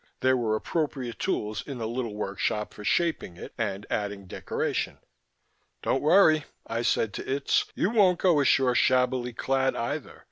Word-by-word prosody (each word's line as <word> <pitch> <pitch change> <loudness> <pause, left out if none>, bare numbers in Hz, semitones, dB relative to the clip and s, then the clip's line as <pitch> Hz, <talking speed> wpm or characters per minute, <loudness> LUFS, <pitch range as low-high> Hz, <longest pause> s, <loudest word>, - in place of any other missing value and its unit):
There 130 0 +4
were 115 -3 0
appropriate 130 - -3
tools 105 0 -1
in 140 -3 -7
the 115 -2 -3
little 115 -2 -3
workshop 105 +1 -2
for 105 - -10
shaping 160 - 0
it - - -9
and 105 -2 -3
adding 100 -1 -2
decoration. 90 - -3 0.9
"Don't 135 - +1
worry," 155 -2 +5 0.2
I 115 +1 -2
said 110 -3 +1
to - - -5
Itz. 140 +1 +1
"You 200 - +1
won't 195 -6 +4
go 175 -5 +3
ashore 135 -2 +3
shabbily 125 -1 +2
clad 135 +2 0
either. 145 +5 -4
125 Hz, 155 wpm, -27 LUFS, 110-145 Hz, 0.9 s, worry